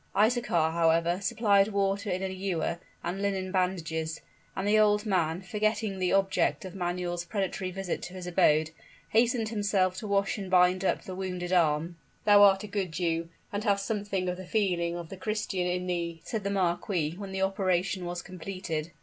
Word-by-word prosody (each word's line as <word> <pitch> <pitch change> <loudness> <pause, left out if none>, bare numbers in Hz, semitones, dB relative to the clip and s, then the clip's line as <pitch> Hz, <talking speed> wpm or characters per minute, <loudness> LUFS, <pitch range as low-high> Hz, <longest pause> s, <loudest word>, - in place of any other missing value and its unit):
Isaachar, 210 -7 +2
however, 170 +1 +2
supplied 205 -2 +3
water 200 0 0
in 185 +1 -1
an 190 - -2
ewer, 180 -3 -2 0.2
and 185 +3 -3
linen 190 -2 -1
bandages; 165 -4 -1 0.3
and 190 +1 -2
the 215 +1 +4
old 210 0 +3
man, 180 -3 0
forgetting 210 +1 -1
the 180 -1 +1
object 195 0 +1
of 185 - -7
Manuel's 175 -1 -2
predatory 190 +1 -2
visit 190 -1 -4
to 180 - -8
his 185 -1 -6
abode, 160 -2 +3 0.4
hastened 230 0 +2
himself 205 -4 +1
to 210 - -5
wash 200 +1 +1
and 195 -2 -5
bind 180 0 +4
up - - 0
the 185 - -7
wounded 180 -1 -3
arm. 165 0 +2 0.3
"Thou 205 -1 +7
art 195 -1 +6
a - - -5
good 195 -4 -2
Jew 165 0 -1 0.2
and 205 +1 -2
hast 200 -2 +1
something 200 -4 -2
of 180 0 -2
the 185 -1 -9
feeling 180 -5 0
of 170 -2 -7
the 195 - -8
Christian 205 -3 -2
in 180 0 -1
thee," 170 -2 -2
said 220 -3 -3
the 200 - -1
marquis, 175 -4 0
when 195 0 -7
the 190 0 -1
operation 190 -1 0
was 175 0 -4
completed. 180 -3 -5
185 Hz, 185 wpm, -29 LUFS, 175-200 Hz, 0.4 s, Thou